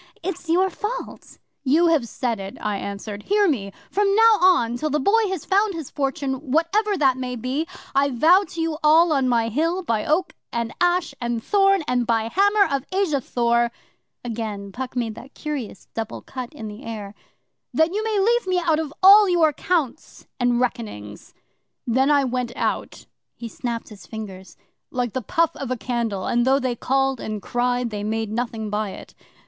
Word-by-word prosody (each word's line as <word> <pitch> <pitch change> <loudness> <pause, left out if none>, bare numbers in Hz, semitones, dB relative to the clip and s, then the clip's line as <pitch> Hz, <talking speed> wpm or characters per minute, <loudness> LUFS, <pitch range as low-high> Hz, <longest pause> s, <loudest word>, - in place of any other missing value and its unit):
It's 360 -1 -5
your 370 +3 +3
fault." 430 +7 -6 0.3
'"You 300 +6 +4
have 300 -8 +2
said 235 -4 -2
it," 195 0 -7
I 210 -1 -2
answered. 200 +1 -6
"Hear 410 - +2
me! 210 - -1 0.2
From 400 0 +2
now 450 -1 +6
on 345 -11 +4
till 305 +6 -2
the 300 +1 +1
Boy 435 +9 +3
has 380 -5 -4
found 400 0 +2
his 320 -5 -6
fortune, 275 -1 -3
whatever 390 +7 +2
that 265 -5 +3
may 250 -1 -4
be, 260 +7 -2 0.3
I 275 +1 +3
vow 325 +10 +5
to 335 - -9
you 325 -1 -1
all 320 +2 +5
on 265 -3 +2
my 230 -2 +2
Hill, 330 - 0
by 225 -9 0
Oak, 340 +5 0 0.2
and 235 -1 -2
Ash, 355 -3 +2
and 235 -1 -2
Thorn, 390 -3 +3
and 245 -1 0
by 225 -2 +2
the 225 - -4
Hammer 405 +2 +4
of 270 - -3
Asa 370 -8 +1
Thor" 235 -1 +1 0.5
again 215 -4 -5
Puck 255 +4 -6
made 235 -3 -1
that 270 +5 -13
curious 285 -10 -5
double 225 0 -5
cut 255 -2 -7
in 285 -8 -8
the 210 +5 -9
air 210 -4 -6 0.6
'"that 320 +3 +2
you 425 +2 -1
may 440 -1 0
leave 470 +2 +2
me 370 -1 +1
out 330 -3 +2
of 310 -3 -3
all 405 +1 +9
your 330 -4 +3
counts 315 -4 -2
and 245 -1 +2
reckonings." 215 - -4 0.5
Then 260 +4 +2
I 285 -1 +4
went 250 -2 -2
out' - - -3 0.3
he 235 - -7
snapped 235 0 -5
his 195 -5 -13
fingers 190 -4 -8 0.3
'like 245 -3 -2
the 260 - -2
puff 330 +8 +1
of 275 - -5
a 255 - -1
candle, 230 -5 -2
and 240 0 +2
though 265 +2 +4
they 255 -3 -1
called 270 +1 0
and 215 -1 -4
cried, 245 +2 -1
they 205 -1 -4
made 220 0 -2
nothing 225 -2 -3
by 210 0 -1
it. - - -11
265 Hz, 190 wpm, -23 LUFS, 230-335 Hz, 0.6 s, all